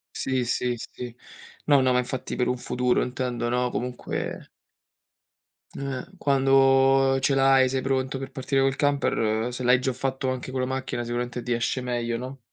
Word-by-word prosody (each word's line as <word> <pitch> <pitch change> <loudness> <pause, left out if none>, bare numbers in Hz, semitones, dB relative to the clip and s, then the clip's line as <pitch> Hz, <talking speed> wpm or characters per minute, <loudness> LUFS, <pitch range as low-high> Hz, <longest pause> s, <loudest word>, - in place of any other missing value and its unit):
Sì, 130 -2 -1
sì, 125 +1 0
sì. 120 +1 -8 0.5
No, 145 -2 +5
no, 130 -1 +3
ma 125 - +3
infatti 125 +1 -3
per 125 - +1
un 125 0 0
futuro 125 0 0
intendo 125 -2 -2
no, 125 0 0
comunque 125 0 -4 1.3
Eh. 135 -2 -4
Quando 135 -1 +4
ce 135 - +2
l'hai, 135 -1 +5
sei 130 0 0
pronto 130 0 -1
per 135 0 -6
partire 135 +1 -1
col 135 0 +2
camper, 120 -6 +1
se 125 - -5
l'hai 125 +1 +4
già 130 -1 -1
fatto 130 +1 -2
anche 130 0 -3
con 130 0 -2
la 130 - 0
macchina, 130 -2 -3
sicuramente 120 +1 -3
ti 120 0 -2
esce 120 +2 0
meglio, 120 -2 -2
no? 130 +2 -7
130 Hz, 175 wpm, -25 LUFS, 125-135 Hz, 1.3 s, No